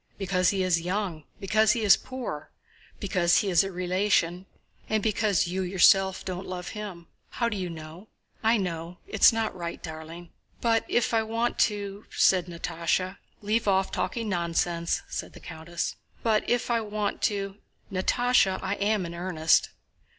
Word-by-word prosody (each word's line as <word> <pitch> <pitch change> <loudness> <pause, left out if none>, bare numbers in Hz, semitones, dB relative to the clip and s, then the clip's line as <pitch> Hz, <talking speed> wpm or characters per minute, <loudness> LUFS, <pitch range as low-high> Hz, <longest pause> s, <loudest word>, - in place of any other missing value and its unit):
"Because 185 -2 +1
he 195 -2 0
is 175 -2 +2
young, 180 -4 -3
because 215 +2 +3
he 230 - -2
is 200 -2 +8
poor, 245 - -6 0.5
because 180 -4 +2
he 200 - +1
is 170 0 +5
a 195 - -4
relation... 185 0 0 0.4
and 215 -1 +1
because 210 -4 +2
you 180 +2 -2
yourself 190 +1 +4
don't 185 0 -5
love 180 -1 -5
him." 200 -5 -7 0.2
"How 235 -1 -1
do 220 - -3
you 185 -3 -3
know?" 165 +4 -9 0.3
"I 225 +1 +4
know. 175 -2 -4
It 215 - -6
is - - +9
not 225 -3 -2
right, 170 -2 -5
darling!" 160 +1 -8 0.3
"But 225 -1 +2
if 240 0 +1
I 225 - +4
want 230 +2 -1
to..." 205 0 -6
said 185 -2 +3
Natásha. 170 +2 -2 0.2
"Leave 215 +2 0
off 190 -1 +2
talking 230 -2 -2
nonsense," 170 -2 -1
said - - -5
the - - -12
countess. 170 +1 -5 0.3
"But 220 -2 +1
if 245 0 +1
I 230 -1 +2
want 210 -1 -3
to..." 200 -1 -4 0.3
"Natásha, 195 +1 +2
I 190 +1 -1
am 205 -2 +1
in 170 - -6
earnest..." 170 -2 +2
190 Hz, 165 wpm, -27 LUFS, 175-215 Hz, 0.5 s, is